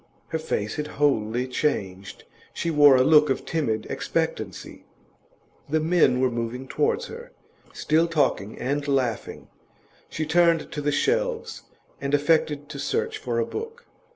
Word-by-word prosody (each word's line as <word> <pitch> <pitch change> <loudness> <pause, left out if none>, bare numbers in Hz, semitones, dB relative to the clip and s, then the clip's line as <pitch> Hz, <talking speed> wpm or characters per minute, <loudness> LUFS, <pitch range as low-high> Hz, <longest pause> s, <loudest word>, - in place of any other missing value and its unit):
Her 160 - -2
face 105 -9 -3
had 150 0 -3
wholly 125 -4 +1
changed; 100 -8 -3 0.3
she 170 - -1
wore 145 -3 +7
a 130 - +5
look 150 +1 +5
of 135 - -1
timid 115 -10 -1
expectancy. - - -3 0.9
The 155 +2 +2
men 155 -6 +3
were 130 -1 +2
moving 120 +2 -4
towards 460 - 0
her, 475 +1 -10 0.4
still 160 +2 +1
talking 145 -10 0
and 145 +3 -2
laughing. 130 -5 -2 0.6
She 155 - -3
turned 170 0 +2
to 150 - -4
the 145 0 0
shelves, 480 - -1 0.4
and 140 +1 +1
affected 145 -1 +1
to 145 -2 -7
search - - -2
for 120 -3 -3
a 115 - +1
book. 460 +2 -7
145 Hz, 145 wpm, -25 LUFS, 125-165 Hz, 0.9 s, wore